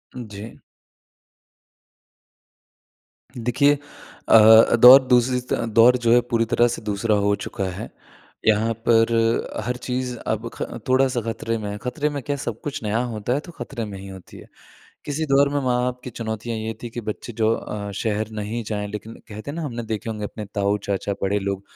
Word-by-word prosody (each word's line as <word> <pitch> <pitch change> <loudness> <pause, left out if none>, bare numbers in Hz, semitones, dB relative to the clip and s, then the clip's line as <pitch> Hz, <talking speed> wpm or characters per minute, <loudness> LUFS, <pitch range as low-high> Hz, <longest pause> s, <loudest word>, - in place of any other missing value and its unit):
जी। 110 -3 -9 2.8
देखिए 125 +5 +3 0.6
अ, 110 +1 +8
दौर 125 +3 +9
दूसरी 125 0 +3
स 125 - -5 0.3
दौर 125 +2 +7
जो 115 - +4
है 120 - +7
पूरी 115 -1 +2
तरह 120 - +4
से - - -10
दूसरा 105 +1 0
हो 100 0 +2
चुका 100 - -5
है। 90 - -7 0.6
यहाँ 110 +1 +3
पर 115 0 +4 0.5
हर 125 +1 -1
चीज़ 125 0 -3
अब 110 +2 -2
ख - - -12 0.3
थोड़ा-सा 130 -1 +2
खतरे 115 0 -3
में 105 -2 -5
है, 105 - -5
खतरे 125 +7 -2
में 145 -1 -4
क्या 145 - -2
सब 120 -4 -5
कुछ 145 - -5
नया 105 +2 0
होता 110 +3 -2
है 140 - 0
तो 175 - -9
खतरे 130 -8 -6
में 100 -2 -8
ही 100 - -9
होती 95 -1 -12
है। - - -13 0.6
किसी 150 +2 -2
दौर 140 0 +4
में 145 - -3
माँ-बाप 125 0 0
की 125 - -6
चुनौतियाँ 115 0 -4
ये 110 +1 -4
थी 120 - -6
कि 120 - -5
बच्चे 110 +2 -6
जो 110 0 +1
अ, 100 -2 -5
शहर 110 +1 -2
नहीं 110 +2 -4
जाएँ, 105 -1 -3
लेकिन 105 +2 -7
कहते 110 +5 -7
हैं - - -7
ना 170 - -3
हमने 120 -6 -4
देखे 110 0 -4
होंगे 105 -1 -5
अपने 105 +1 -6
ताऊ-चाचा 100 0 -1
बड़े 100 +1 +1
लोग 100 -1 -3
115 Hz, 180 wpm, -22 LUFS, 105-125 Hz, 2.8 s, दौर